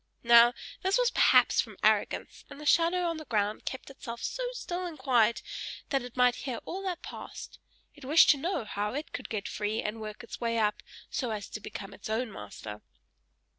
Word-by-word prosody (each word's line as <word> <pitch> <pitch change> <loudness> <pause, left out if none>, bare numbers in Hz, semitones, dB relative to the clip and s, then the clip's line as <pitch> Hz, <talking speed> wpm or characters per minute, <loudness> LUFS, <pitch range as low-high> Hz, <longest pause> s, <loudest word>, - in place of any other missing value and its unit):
Now 235 +1 +7 0.3
this 380 +3 +2
was - - +3
perhaps - - +5
from - - -10
arrogance; - - +1
and 280 0 -10
the 300 - -8
shadow 340 +4 +4
on 335 -1 -2
the 310 - -8
ground 210 -3 -1
kept 260 +1 -5
itself 235 -3 -8
so - - -3
still 365 -7 -4
and 330 -3 -8
quiet, 240 -4 +3 0.5
that 275 -2 +2
it 245 0 -10
might 250 -1 +4
hear 250 -3 -2
all 380 - -4
that 360 -2 -3
passed: - - -9 0.3
it 290 - -15
wished 300 +5 +7
to 290 - +2
know 305 - -2
how 210 +2 -3
it 295 +2 -5
could - - -5
get 215 -2 -3
free, 210 +1 -2
and 215 +1 -3
work 215 +2 -7
its 235 - -9
way 230 -1 0
up, 210 -2 +1 0.3
so 250 - -1
as 210 -2 -4
to - - -6
become 195 0 -7
its 205 - -9
own 225 +1 -1
master. 105 - -8
245 Hz, 205 wpm, -30 LUFS, 215-305 Hz, 0.5 s, Now